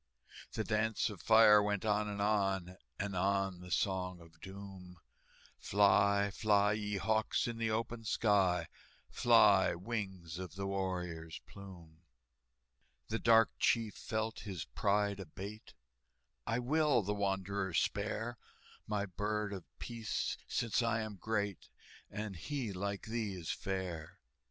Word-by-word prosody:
The 110 - -1
dance 110 +1 0
of 95 -6 -10
fire 110 0 +7
went 105 0 -1
on 105 0 +2
and 100 -1 -2
on, 95 -3 +1 0.2
And 100 -1 -3
on 95 0 +1
the 90 0 -10
Song 90 0 -1
of 80 -1 -17
Doom, 95 -2 -10 0.6
"Fly, 100 0 +4
fly, 105 0 +3
ye 105 -1 -2
hawks, 110 +1 +1
in 115 -1 -4
the 115 -1 0
open 115 +1 -2
sky, 95 -6 +2 0.4
Fly, - - +5
wings 95 -4 -5
of 90 -2 -7
the 100 0 -3
warrior's 90 -4 -3
plume!" 85 -5 -12 1.1
The 115 +1 -1
dark 115 -1 +5
chief 115 -3 +2
felt 110 0 -3
his 95 -6 -5
pride 100 0 0
abate: 100 +4 -8 0.7
"I 115 0 +1
will 140 -1 +2
the 105 +2 -1
wanderer 100 -1 -1
spare, 110 +5 -1 0.5
My 105 -1 -1
Bird 105 +2 -2
of 95 -4 -7
Peace, 115 -2 -3
since 115 +1 0
I 115 -1 +1
am 110 -2 -6
great, 105 -2 -2 0.4
And 105 -2 -5
he, 125 - -3
like 100 +1 -3
thee, 110 -3 -2
is 85 -3 -4
fair!" 90 -4 -4
100 Hz, 130 wpm, -34 LUFS, 95-110 Hz, 1.1 s, fire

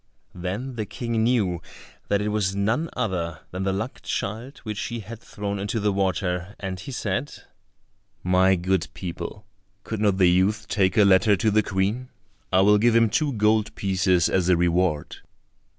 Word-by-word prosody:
Then 100 +9 -5
the 110 -2 -3
King 115 -2 -2
knew 105 -8 +1 0.5
that 100 0 +1
it 105 - -1
was 100 -2 0
none 115 +11 0
other 85 -9 -2
than 90 - -4
the 95 - +1
luck 110 +7 -4
child 115 +8 -4
which 105 -2 -4
he 120 -1 -4
had 110 +3 -9
thrown 100 -2 -5
into 100 +3 -2
the 105 -1 +1
water, 95 -1 -1
and 95 -2 -5
he 115 - -8
said, 115 +3 -2 0.9
"My 95 +1 +4
good 90 0 0
people, 95 +3 -6 0.4
could 110 - -4
not 100 -3 +2
the 95 - +5
youth 95 +4 +1
take 95 -3 +1
a 105 - +6
letter 100 +2 +5
to 110 +3 +1
the 110 +1 +4
Queen; 105 +6 -1 0.4
I 95 - +5
will 105 +1 +5
give 115 +1 +3
him 115 -2 +4
two 145 +3 +1
gold 105 0 +1
pieces 95 -3 +2
as 90 -1 +1
a 90 - +5
reward?" 85 -3 0
100 Hz, 175 wpm, -24 LUFS, 95-110 Hz, 0.9 s, a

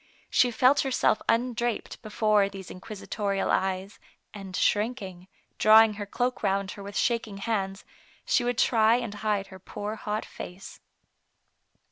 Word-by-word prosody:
She 250 - +4
felt 255 +4 +4
herself 265 -5 +1
undraped 240 0 -1
be 215 - -9
fore 210 -2 +2
these 195 -2 -9
inquisitorial 200 +1 -3
eyes, 190 +1 -1 0.3
and 195 -2 -8
shrinking, 205 -5 -1 0.3
draw 220 +1 +8
ing 220 -1 0
her 205 -1 -6
cloak 245 +4 -2
round 195 -1 0
her 200 - -9
with 200 0 -6
shaking 230 -4 0
hands, 195 -2 -3 0.4
she - - +2
would 245 -1 -1
try 225 -1 +4
and 235 -4 -3
hide 205 -1 -1
her 190 - -11
poor 205 +3 -6
hot 210 +1 -3
face. 180 +2 -10
210 Hz, 145 wpm, -27 LUFS, 195-230 Hz, 0.4 s, draw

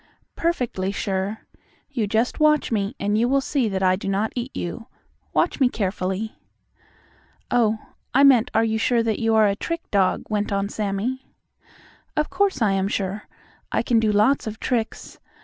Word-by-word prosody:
"Perfectly 245 - -1
sure. 195 +1 -2 0.5
You 235 -7 -1
just 225 +7 0
watch 305 -3 +3
me, 205 +2 -1
and 205 +2 +1
you 240 +2 +2
will 275 +1 +3
see 270 -4 0
that 190 -1 -2
I 185 0 +4
do 195 +1 -4
not 200 +3 0
eat 245 +1 -3
you. 225 +7 -5 0.4
Watch - - +1
me 260 -3 +4
carefully." 195 0 -3 1.1
"Oh, 225 -3 +3 0.3
I 275 +3 +4
meant 255 -5 +6
are 225 - +4
you 220 -1 0
sure 235 +1 +2
that 220 -2 -1
you 225 -1 +2
are 220 -1 +6
a 200 -1 +2
trick 335 +10 -5
dog," 195 -2 +2
went 210 -1 -1
on 200 0 0
Sammie. 215 +6 -3 0.9
"Of 300 - 0
course, 390 - +1
I 205 - +3
am 195 0 +1
sure. 200 +1 -3 0.4
I - - +1
can 235 -2 +3
do 220 -1 +2
lots 215 +6 +3
of 220 +1 -5
tricks. 230 -3 -3
220 Hz, 175 wpm, -23 LUFS, 200-245 Hz, 1.1 s, meant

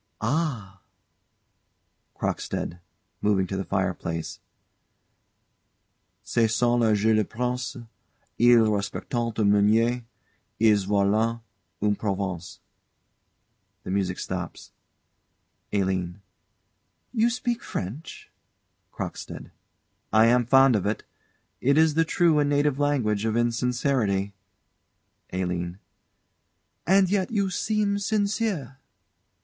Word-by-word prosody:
Ah 115 - -2 1.3
CROCKSTEAD. 85 - -3 0.4
[Moving 100 -2 +2
to 95 - -5
the 95 - -2
fireplace.] 90 -4 -3 1.8
"Ce 115 -2 +1
sont 120 +1 +2
là 110 -2 +3
jeux 110 +2 +2
de 110 0 +3
Princes: 125 +4 -3 0.6
Ils 120 0 +6
respectent 100 -2 -3
un 115 -3 0
meunier, 110 +4 +3 0.6
Ils 105 -3 +4
volent 105 +3 +1 0.4
une 105 -1 +2
province." 95 -3 -4 1.2
[The - - -5
music 95 -2 -1
stops. - - -6 1.0
ALINE. 95 -2 -1 0.9
You 230 0 +3
speak 240 0 -2
French? 115 - -7 0.6
CROCKSTEAD. - - -7 0.6
I 110 +1 +6
am 120 0 +3
fond 135 -1 +6
of 100 -1 0
it. 105 - -2 0.6
It 140 +3 +2
is 160 -1 +5
the 165 +2 +2
true 165 -2 +3
and 145 -1 +2
native 145 -1 +1
language 125 -8 +1
of 110 0 0
insincerity. 120 -4 0 1.0
ALINE. 90 -1 -3 1.1
And 190 +1 +5
yet 190 0 0
you 200 -4 0
seem 205 0 0
sincere. 200 - -1
115 Hz, 100 wpm, -25 LUFS, 100-145 Hz, 1.8 s, Ils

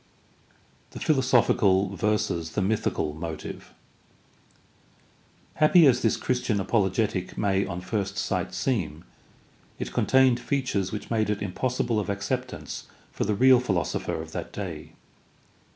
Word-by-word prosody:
The - - -6
philosophical 110 -8 +3
versus 85 -5 -1
the 105 - 0
mythical 95 -7 -1
motive. 80 -1 -7 0.9
— - - -26
^Happy 155 +1 +7
as 125 -1 +3
this 115 - +2
Christian 125 -4 -1
apologetic 95 -1 0
may 100 -1 +1
on 90 -1 -5
first 100 +1 -3
sight - - -1
seem, 90 - -2 0.7
it - - -5
con - - 0
tained 130 -2 +5
features 120 -10 -1
which 105 - -6
made 110 -2 +1
it 105 -1 -1
impossible 115 +3 -1
of 105 - -3
acceptance 120 +6 -4 0.2
for - - -2
the 105 0 0
real 130 +3 +6
philosopher 95 -12 -2
of 80 0 -7
that - - -5
day. 85 -7 -7
105 Hz, 130 wpm, -26 LUFS, 95-125 Hz, 0.9 s, ^Happy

